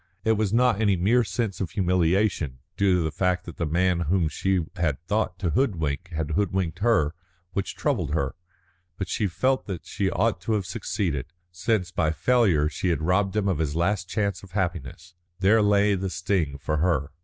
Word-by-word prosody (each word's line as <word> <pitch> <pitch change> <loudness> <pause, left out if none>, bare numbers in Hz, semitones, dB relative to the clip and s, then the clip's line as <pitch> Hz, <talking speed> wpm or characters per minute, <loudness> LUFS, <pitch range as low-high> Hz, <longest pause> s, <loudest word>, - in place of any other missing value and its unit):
It 110 - +3
was 110 -2 +1
not 115 -2 +3
any 100 -3 +3
mere 110 +8 +3
sense 100 +1 -3
of 90 - -2
humiliation, 90 -5 +1 0.2
due 100 -2 +3
to 90 - +1
the 80 - -1
fact 90 +1 0
that 85 - -9
the 85 - -1
man 90 +2 +2
whom 90 -4 +2
she 95 0 0
had 80 -7 0
thought 105 -2 -1
to 90 -3 -1
hoodwink 90 - 0
had 80 -2 -3
hoodwinked 95 -2 -1
her, 100 -9 +2 0.4
which 100 - -2
troubled 75 +1 -1
her. 70 -4 -1 0.6
But 95 -3 -4
she 105 - 0
felt 130 +9 0
that 95 -5 -5
she 100 -2 -1
ought 100 -2 0
to 110 - -1
have 105 -3 0
succeeded, 70 -6 -2 0.2
since 90 +1 -1
by 80 - +1
failure 90 -4 +3
she 90 +3 -2
had 80 -2 0
robbed 95 +4 +1
him 105 -2 +1
of 95 -6 0
his 75 -2 -1
last 90 +2 0
chance 100 -4 -1
of 95 -2 -15
happiness. 85 -3 -3 0.3
There 105 +4 +4
lay 105 0 +4
the 95 0 -2
sting 85 -5 -1
for 75 +2 -2
her. 75 -3 +1
90 Hz, 190 wpm, -25 LUFS, 80-100 Hz, 0.6 s, There